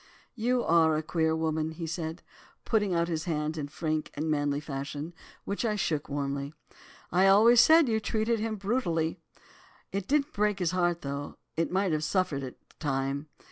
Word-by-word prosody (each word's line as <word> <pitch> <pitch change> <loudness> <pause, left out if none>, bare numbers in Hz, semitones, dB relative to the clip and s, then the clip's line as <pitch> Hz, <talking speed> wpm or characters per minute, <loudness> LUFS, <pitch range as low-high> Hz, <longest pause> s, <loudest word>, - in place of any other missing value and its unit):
"'You're 195 - +3
a 155 - -1
queer 160 0 +1
woman,' 160 0 -1
said 165 0 -4
he, - - -24 0.2
putting 210 -5 +1
out 170 0 +1
his 160 -2 -2
hand 155 -2 -1
in 150 -3 -4
frank 155 +1 -2
and 155 +2 -1
manly 145 -1 0
fashion, 145 +2 -5 0.3
which 200 - -2
I 220 -2 +1
shook 155 -7 -1
warmly. 140 +1 -3 0.6
'I 185 +3 +4
always 225 +5 +7
said 320 -2 +6
you 220 -2 +1
treated 220 +2 0
him 220 0 -2
brutally. 190 -7 -1 0.7
It 195 -1 -3
didn't 295 +1 +1
break 210 -1 +1
his 180 -4 0
heart, 175 -2 0
though 140 +1 -5 0.2
it 165 +1 0
might 190 0 +1
have 155 0 0
suffered 165 -5 0
at 130 -2 -6
the - - -26
time. 140 0 -2
165 Hz, 175 wpm, -29 LUFS, 150-200 Hz, 0.7 s, always